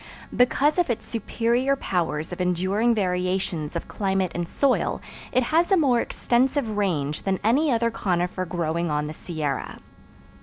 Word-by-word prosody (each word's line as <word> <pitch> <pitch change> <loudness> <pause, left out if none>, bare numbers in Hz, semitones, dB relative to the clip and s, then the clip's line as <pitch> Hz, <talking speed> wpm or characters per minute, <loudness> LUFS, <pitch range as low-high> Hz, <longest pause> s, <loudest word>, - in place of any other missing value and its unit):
Because 280 +6 +3
of 350 - +2
its 235 - -2
superior 235 +4 0
powers 165 - -2
of 180 - -4
enduring 190 +6 +1
variations 180 -4 -1
of 170 - -4
climate 190 -3 -1
and 175 0 -3
soil, 270 +7 +1 0.3
it 255 +1 +2
has 330 +9 +2
a 385 - +6
more 255 -7 +3
extensive 250 -2 0
range 155 -8 -1
than 190 -1 -1
any 275 +8 +3
other 230 -1 +1
conifer 185 -4 -1
growing 170 -1 -1
on 150 0 0
the 155 - -5
Sierra. 155 -5 -4
195 Hz, 150 wpm, -24 LUFS, 175-245 Hz, 0.3 s, a